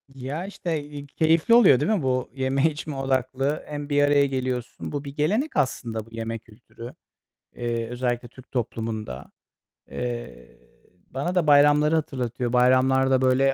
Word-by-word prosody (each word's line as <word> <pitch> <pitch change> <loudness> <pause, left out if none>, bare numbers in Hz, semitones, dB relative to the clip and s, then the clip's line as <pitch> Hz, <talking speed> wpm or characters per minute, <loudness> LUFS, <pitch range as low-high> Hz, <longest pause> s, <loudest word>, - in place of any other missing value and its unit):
Ya, 135 +7 -5
işte, 170 -6 -4
eee, 145 -1 -9
keyifli 160 +8 +2
oluyor, 205 - +7
değil 150 +9 0
mi? 210 -5 +1
Bu 130 -1 0
yeme 135 +2 0
içme 150 -1 -6
odaklı 135 +2 -1
hem 145 -1 -6
bir 145 0 +3
araya 145 0 +4
geliyorsun. 130 -3 -4
Bu 145 -1 -4
bir 140 0 -9
gelenek 215 - 0
aslında 115 -5 -1
bu - - -18
yeme 115 0 -4
kültürü. 115 +2 -13 0.6
Eee, 115 -1 -2
özellikle 120 0 -2
Türk 130 +2 -17
toplumunda. 110 - -4 0.6
Eee, 120 - -6 0.5
bana 160 +8 -3
da 170 -4 +2
bayramları 150 +2 +5
hatırlatıyor. 125 -5 -2
Bayramlarda 130 +1 +4
böyle 130 +1 +3
130 Hz, 145 wpm, -24 LUFS, 120-145 Hz, 0.6 s, oluyor